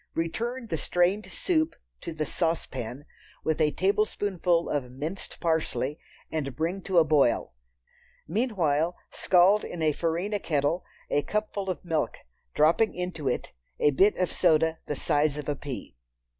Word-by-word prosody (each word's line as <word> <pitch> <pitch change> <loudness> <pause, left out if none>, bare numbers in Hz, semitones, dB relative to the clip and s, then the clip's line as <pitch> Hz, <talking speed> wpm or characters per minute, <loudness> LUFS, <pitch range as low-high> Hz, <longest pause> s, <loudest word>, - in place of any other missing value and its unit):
Return 235 +10 -2
the 165 -7 -2
strained 180 +7 +1
soup 355 -10 0 0.3
to - - -5
the 155 -1 -2
saucepan, 140 -5 -2 0.4
with 160 0 0
a 150 - +5
tablespoonful 190 -2 +1
of 135 -4 -2
minced 150 +9 -5
parsley, 160 -3 0 0.3
and 140 -4 -2
bring 170 +5 -1
to 190 -1 -1
a 165 - +8
boil. 140 - +2 0.7
Meanwhile, 175 - +1 0.2
scald 190 +3 +4
in 170 -2 -4
a 155 - +4
farina 170 +7 -1
kettle 155 +1 0 0.3
a 145 - +3
cupful 210 +1 -2
of 185 - -4
milk, 160 -3 -1 0.4
dropping 165 +9 +4
into 180 -5 -3
it 125 - -1 0.3
a 150 - +4
bit 195 +10 +4
of 180 - 0
soda 160 +1 +3
the 150 - -2
size 145 +2 +1
of 150 - -5
a 145 - 0
pea. 135 - -7
165 Hz, 145 wpm, -27 LUFS, 150-190 Hz, 0.7 s, a